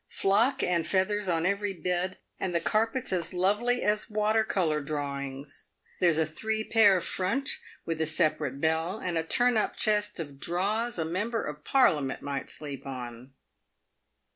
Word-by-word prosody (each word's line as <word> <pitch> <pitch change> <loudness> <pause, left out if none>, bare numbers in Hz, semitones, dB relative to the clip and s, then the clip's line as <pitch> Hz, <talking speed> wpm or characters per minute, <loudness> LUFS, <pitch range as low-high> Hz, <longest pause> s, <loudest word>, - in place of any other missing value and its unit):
Flock 230 +8 +2
and 170 -2 +1
feathers 195 +2 0
on 165 -1 +1
every 200 +1 0
bed, 180 +1 -2 0.2
and 180 -2 -2
the - - +3
carpets 225 +6 0
as 170 -2 -1
lovely 210 +7 +1
as 210 0 +1
water 215 +1 +2
colour 165 -8 0
drawings. 140 -1 -5 0.3
There's 170 -4 +3
a 160 - +3
three 220 +8 -2
pair 210 -4 +5
front, 190 +9 0 0.3
with 165 -1 -2
a 160 - +2
separate 150 -3 0
bell, 160 +5 0
and 180 -5 -3
a 165 - +2
turn 245 +7 +3
up 215 - 0
chest 210 -2 +1
of 145 -4 -6
draws 205 +9 -1
a 160 - -1
member 210 +8 -2
of 150 0 -7
Parliament 150 - +2
might 140 -1 -4
sleep 145 -2 -7
on." 125 0 -7
180 Hz, 160 wpm, -28 LUFS, 155-210 Hz, 0.3 s, pair